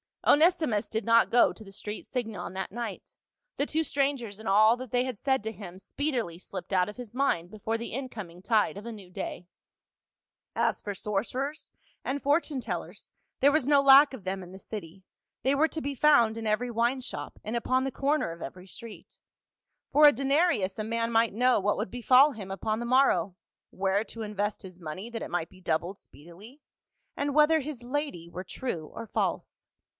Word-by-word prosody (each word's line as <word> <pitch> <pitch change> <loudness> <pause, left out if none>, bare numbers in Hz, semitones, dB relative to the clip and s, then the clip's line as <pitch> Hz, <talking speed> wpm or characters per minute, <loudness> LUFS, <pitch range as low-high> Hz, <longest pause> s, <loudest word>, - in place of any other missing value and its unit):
Onesimus 300 - +4
did 220 +1 -2
not 230 0 +4
go 240 - +5
to 220 - -12
the 195 - -13
street 210 +2 -6
Singon 215 -9 -4
that 190 0 -4
night; 230 -2 -6 0.4
the 285 - +1
two 320 +1 0
strangers 270 -8 -1
and 220 - -8
all 215 +3 +6
that 255 -2 -8
they 245 0 +2
had 255 -4 -4
said 265 0 0
to 220 - -3
him 185 -4 -10
speedily 240 - -2
slipped 185 0 -7
out 185 +1 +3
of 210 - -10
his 245 -4 -8
mind 180 -11 +1
before 220 +2 -3
the 235 - -6
in 265 +2 -3
coming 180 -8 -9
tide 210 -1 +2
of 205 - -8
a 235 - -5
new 200 -5 -11
day. 175 -1 -6 1.1
As - - +1
for 205 - -4
sorcerers 240 +9 -3 0.3
and 275 +1 -2
fortune 290 -1 +1
tellers, - - -6 0.3
there 280 +2 +6
was 285 -3 +1
no 285 -1 +5
lack 275 +1 +8
of 245 -7 -8
them 190 +1 -3
in 180 - -11
the 190 - -10
city, 190 -3 -8 0.4
they 270 +2 +3
were 310 +3 +4
to 320 - -5
be 285 -1 -3
found 235 -6 +4
in 225 - -5
every 215 +4 0
wine 240 +3 +1
shop, - - -7
and 215 +3 -4
upon 255 +2 +1
the 270 - -2
corner 280 - 0
of 165 0 -8
every 180 +7 -9
street; 225 +3 -11 0.7
for 300 0 +8
a - - +9
denarius 275 - +1
a - - -1
man 230 +1 -1
might 225 -1 +3
know 250 +2 +3
what 205 +1 +1
would - - -3
befall 255 +4 +5
him 205 -6 -8
upon 215 +3 -2
the 240 - -3
morrow; 235 -8 +3 0.4
where 195 +2 0
to 230 0 -9
invest 210 0 -2
his 185 -2 -11
money 175 +7 -6
that 230 -1 -4
it - - -7
might 175 -2 -1
be 185 - -18
doubled 175 +3 -1
speedily, 195 - -14 0.6
and 285 0 -1
whether 305 +1 +5
his 285 -3 -6
lady 245 - -3
were 180 +2 -6
true 180 -5 -5
or 230 - -6
false. - - -3
225 Hz, 200 wpm, -28 LUFS, 195-270 Hz, 1.1 s, a